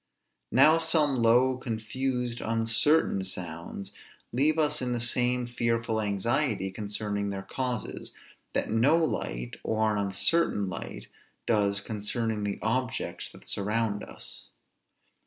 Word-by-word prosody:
Now 155 +6 +6
some 160 -4 +3
low, 125 +3 +4
confused, 125 +1 -3
uncertain 115 +1 +4
sounds, 90 0 -5 0.4
leave 150 +6 +3
us 150 -2 +2
in 125 -1 -1
the 120 - -1
same 125 +1 +2
fearful 115 -2 -1
anxiety 105 +1 0
concerning 100 0 -3
their 95 -1 -4
causes, 125 +1 -4 0.4
that - - -1
no 125 +9 +4
light, - - -2
or 110 0 +1
an 105 - 0
uncertain 100 - +1
light, 95 - -6 0.4
does 100 -2 +2
concerning 110 0 -2
the 100 -1 -2
objects 125 +2 -2
that - - -15
surround 105 +1 -1
us. - - -9
115 Hz, 120 wpm, -28 LUFS, 105-125 Hz, 0.4 s, Now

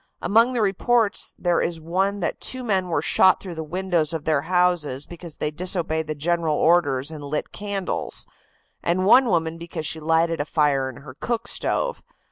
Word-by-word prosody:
Among 230 +7 +3
the 235 -3 +1
reports 210 +2 +1
there 175 -1 +1
is 170 -1 -2
one 190 +5 -1
that 170 - -2
two 255 -1 -2
men 190 -5 0
were 160 -4 -1
shot 185 +2 +4
through 185 -3 -7
the 160 -1 -5
windows 170 -1 -1
of 160 -2 -4
their 155 -3 +2
houses 175 -7 +1
because 170 -2 -9
they 150 - -2
disobeyed 160 -1 0
the 155 - -3
general 165 +1 0
orders 145 -4 +2
and 150 -2 -8
lit 145 +1 -3
candles, 200 -2 -3 0.6
and 180 +2 0
one 250 +5 +6
woman 165 -4 0
because 165 -2 -6
she 160 - -1
lighted 165 +1 +1
a - - -2
fire 145 -4 +1
in 130 +1 -11
her 130 - -10
cook 230 - -3
stove. - - -2
170 Hz, 185 wpm, -23 LUFS, 155-190 Hz, 0.6 s, one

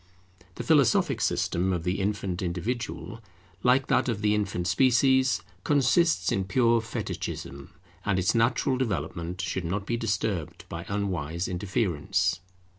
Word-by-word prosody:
The - - -5
philosophic 155 - +3
system 90 -2 0
of 85 -3 -1
the 90 +3 -1
infant 100 -2 -2
individual, 115 +5 -4 0.4
like 130 +2 +3
that - - +2
of 110 -3 -2
the 105 0 +3
infant 100 -4 -1
species, 130 +1 +3 0.2
consists 145 - +3
in 95 - 0
pure 115 +2 +3
Fetichism, 70 -9 -5 0.3
and 100 -2 +1
its 95 0 +2
natural 120 +3 +2
development 90 - -3
should 95 - -2
not 95 +4 -2
be 115 +3 -1
disturbed 100 -6 -2
by 85 +1 -6
unwise 90 -5 -2
interference. 90 -2 0
100 Hz, 130 wpm, -27 LUFS, 90-120 Hz, 0.4 s, philosophic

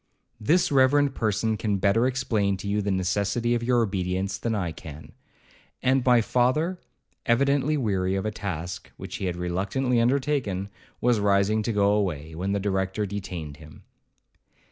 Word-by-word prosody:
This 170 +11 +2
reverend 140 +1 +4
person 110 -1 0
can 105 -1 0
better 100 +6 +3
explain 110 -7 0
to 100 - -7
you 105 +1 0
the 100 - -2
necessity 100 +5 0
of 120 - 0
your 120 0 +2
obedience 95 -1 -2
than 115 +1 -1
I 90 -5 -2
can.' 80 -1 -10 0.7
And 130 0 +3
my 125 -2 +5
father, 140 +11 +1 0.5
evidently 140 +4 +2
weary 95 -7 0
of 95 - -2
a 110 - -1
task 90 -4 -5
which - - -7
he - - -4
had 90 -2 -2
reluctantly 100 +8 0
undertaken, 125 -7 0 0.3
was 120 -2 +3
rising 100 +1 +2
to 110 - -1
go 100 -1 +3
away, 85 -7 -1
when 90 +5 -3
the 100 - 0
Director 95 +1 -1
detained 90 -7 -6
him. 75 -1 -14
105 Hz, 160 wpm, -26 LUFS, 95-120 Hz, 0.7 s, my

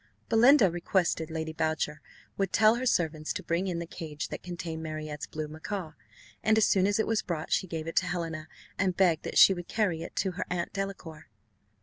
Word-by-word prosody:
Belinda 230 - +6
requested 170 -2 0
Lady 160 0 -4
Boucher 155 -1 -1 0.3
would 195 -2 -1
tell 215 +1 +5
her 250 +2 -2
servants 155 -7 0
to 190 - -5
bring 170 +3 -1
in 175 -2 -2
the 170 - -3
cage 155 -3 -6
that - - -6
contained 170 -2 -5
Marriott's 155 -2 -5
blue 155 0 -5
macaw; 160 +3 -5 0.5
and 220 0 +3
as 220 - +5
soon 190 -1 +3
as 205 - +1
it 220 - +1
was 225 -1 +1
brought 160 -4 -4
she 185 - +1
gave 160 -2 -4
it 165 - -6
to - - +3
Helena, 165 -3 -3 0.3
and 185 -2 +1
begged 175 -5 +3
that - - -3
she 195 - +9
would 175 -2 -7
carry 195 -7 0
it 170 - -8
to 190 - 0
her 175 - -4
Aunt 175 -1 -2
Delacour. 185 -5 -5
170 Hz, 210 wpm, -29 LUFS, 160-195 Hz, 0.5 s, she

